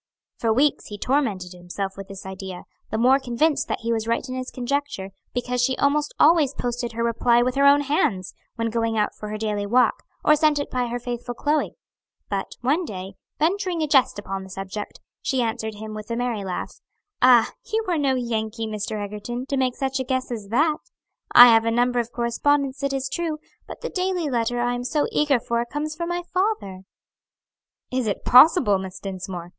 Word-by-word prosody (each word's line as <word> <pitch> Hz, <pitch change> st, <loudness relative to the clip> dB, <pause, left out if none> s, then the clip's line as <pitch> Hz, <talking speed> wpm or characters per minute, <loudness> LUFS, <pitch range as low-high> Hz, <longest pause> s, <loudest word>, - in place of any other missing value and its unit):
For 230 Hz, -, +1 dB
weeks 275 Hz, +6 st, +2 dB
he 205 Hz, -, -7 dB
tormented 210 Hz, -8 st, -1 dB
himself 180 Hz, +2 st, -5 dB
with 195 Hz, -1 st, -8 dB
this 195 Hz, -1 st, -10 dB
idea; 190 Hz, -1 st, -7 dB, 0.3 s
the -, -, -2 dB
more 255 Hz, +4 st, +5 dB
convinced 275 Hz, +3 st, 0 dB
that -, -, -3 dB
he 230 Hz, 0 st, 0 dB
was 225 Hz, 0 st, -2 dB
right 230 Hz, +3 st, 0 dB
in 255 Hz, -, -5 dB
his 255 Hz, 0 st, -4 dB
conjecture, 250 Hz, -6 st, -3 dB, 0.2 s
because 245 Hz, 0 st, -1 dB
she 255 Hz, +1 st, +1 dB
almost 295 Hz, +1 st, +1 dB
always 300 Hz, -3 st, +5 dB
posted 240 Hz, -1 st, -3 dB
her 230 Hz, +1 st, -2 dB
reply 235 Hz, +1 st, +3 dB
with 250 Hz, +1 st, 0 dB
her 280 Hz, +1 st, +4 dB
own 285 Hz, +1 st, +6 dB
hands, 275 Hz, -10 st, 0 dB, 0.2 s
when 230 Hz, -1 st, -2 dB
going 230 Hz, -1 st, 0 dB
out 210 Hz, -1 st, +1 dB
for 210 Hz, -, -8 dB
her 215 Hz, -, -4 dB
daily 210 Hz, -2 st, -2 dB
walk, 250 Hz, +4 st, +3 dB, 0.2 s
or 300 Hz, -, +6 dB
sent 305 Hz, 0 st, +3 dB
it 285 Hz, -, -3 dB
by 250 Hz, -1 st, 0 dB
her 240 Hz, +1 st, -3 dB
faithful 245 Hz, 0 st, -5 dB
Chloe; 295 Hz, +3 st, 0 dB, 0.6 s
but 195 Hz, -1 st, -2 dB
one 290 Hz, +9 st, +1 dB
day, 190 Hz, -, -7 dB, 0.2 s
venturing 355 Hz, +1 st, 0 dB
a -, -, 0 dB
jest 270 Hz, -7 st, +3 dB
upon 195 Hz, -1 st, -4 dB
the 190 Hz, -, -10 dB
subject, 195 Hz, +2 st, -6 dB, 0.2 s
she 265 Hz, -, -1 dB
answered 220 Hz, -1 st, -3 dB
him, 215 Hz, +1 st, -7 dB
with 215 Hz, +1 st, -8 dB
a 230 Hz, -, -1 dB
merry 240 Hz, -4 st, -2 dB
laugh, 185 Hz, -2 st, -5 dB, 0.4 s
"Ah, 245 Hz, -3 st, +6 dB, 0.2 s
you 440 Hz, 0 st, 0 dB
are 345 Hz, -3 st, +1 dB
no 275 Hz, -2 st, +2 dB
Yankee, 225 Hz, -2 st, -2 dB
Mr. 215 Hz, 0 st, -4 dB
Egerton, 210 Hz, +5 st, -5 dB
to 275 Hz, -, -2 dB
make 255 Hz, -2 st, 0 dB
such 270 Hz, 0 st, -2 dB
a -, -, 0 dB
guess 260 Hz, 0 st, -2 dB
as 215 Hz, -4 st, -5 dB
that! 300 Hz, +8 st, +2 dB, 0.5 s
I 245 Hz, -, +11 dB
have 225 Hz, 0 st, +5 dB
a -, -, +2 dB
number 245 Hz, +1 st, +2 dB
of 235 Hz, 0 st, -3 dB
correspondents, 270 Hz, +3 st, 0 dB
it 275 Hz, 0 st, 0 dB
is 270 Hz, 0 st, -2 dB
true; 325 Hz, +1 st, -2 dB, 0.3 s
but -, -, -9 dB
the -, -, -3 dB
daily 365 Hz, -4 st, -1 dB
letter 240 Hz, -1 st, 0 dB
I 245 Hz, 0 st, +1 dB
am 245 Hz, 0 st, -3 dB
so 295 Hz, +4 st, 0 dB
eager 290 Hz, -4 st, +2 dB
for 235 Hz, 0 st, -1 dB
comes 295 Hz, +5 st, -4 dB
from 340 Hz, +1 st, -4 dB
my 350 Hz, 0 st, -2 dB
father." 365 Hz, -, -1 dB, 1.1 s
"Is 255 Hz, -3 st, -1 dB
it 205 Hz, -, -3 dB
possible, 255 Hz, -, +6 dB
Miss 190 Hz, -1 st, -7 dB
Dinsmore! 185 Hz, -3 st, -6 dB
245 Hz, 205 wpm, -23 LUFS, 215-280 Hz, 1.1 s, I